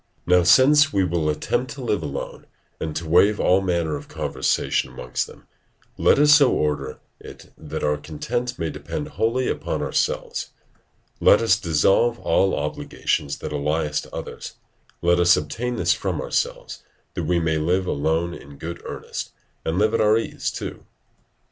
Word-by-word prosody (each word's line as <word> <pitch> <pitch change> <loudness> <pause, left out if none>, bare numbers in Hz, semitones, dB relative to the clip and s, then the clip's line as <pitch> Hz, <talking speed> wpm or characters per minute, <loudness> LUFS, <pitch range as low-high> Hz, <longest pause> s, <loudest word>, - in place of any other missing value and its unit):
Now, 90 0 +5
since 140 - +6
we 100 -2 +2
will 85 -3 0
attempt 120 - -1
to 135 - -8
live 105 -4 0
alone, 70 -1 -6 0.3
and 80 -1 -4
to 85 - -4
waive 100 +6 +4
all 95 +1 +3
manner 85 -4 0
of 70 - -8
conversation - - -1
amongst 60 0 -3
them, - - -16 0.5
let - - +4
us 150 +1 +6
so 145 -3 +6
order 75 -3 -1 0.2
it - - -13
that 80 0 -6
our 75 0 +1
content 120 +12 -4
may 80 -2 -2
depend 150 - -5
wholly 125 -2 0
upon - - -2
ourselves; - - -2 0.7
let - - +6
us 115 -5 +4
dissolve 95 +9 +2
all 95 +1 +2
obligations 70 -1 -2
that 75 - -6
ally 75 +2 0
us 75 0 -2
to - - -14
others; - - -7 0.5
let 85 0 +3
us 90 0 +5
obtain 120 +12 -3
this - - +2
from - - -3
ourselves, - - -3 0.3
that - - -3
we 90 -1 +1
may 80 -2 0
live 90 +4 +1
alone 80 +2 0
in 70 -3 -12
good 85 +3 -7
earnest, - - -6 0.3
and 80 +2 -2
live 110 +2 +2
at 115 - +2
our 110 +1 +4
ease 115 - -3
too. - - -7
85 Hz, 165 wpm, -23 LUFS, 75-115 Hz, 0.7 s, since